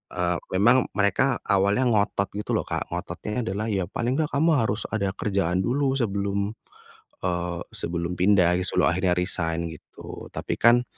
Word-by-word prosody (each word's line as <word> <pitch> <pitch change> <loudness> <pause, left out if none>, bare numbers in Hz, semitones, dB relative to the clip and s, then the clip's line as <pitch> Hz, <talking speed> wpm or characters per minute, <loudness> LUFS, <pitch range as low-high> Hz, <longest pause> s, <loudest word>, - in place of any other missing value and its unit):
eee, 90 0 0 0.2
memang 120 +6 +4
mereka 100 -2 +2
awalnya 100 +6 +2
ngotot 105 -4 +1
gitu 105 - -3
loh, - - -2
Kak, - - -3
ngototnya 105 +4 -4
adalah, 105 +1 -2
"Ya 95 -3 0
paling 120 +5 -1
enggak 155 -2 -1
kamu 160 +4 +3
harus 110 -3 0
ada 100 -3 0
kerjaan 95 -3 0
dulu 135 +5 +1
sebelum," 100 -3 -1 0.8
eee, 90 -1 -1
"sebelum 85 +1 -3
pindah 90 -2 +4 0.2
sebelum - - +2
akhirnya 90 +1 +1
resign," 85 -2 -1
gitu 80 - -11
tapi - - -3
kan 120 +1 +6
100 Hz, 155 wpm, -25 LUFS, 90-115 Hz, 0.8 s, kan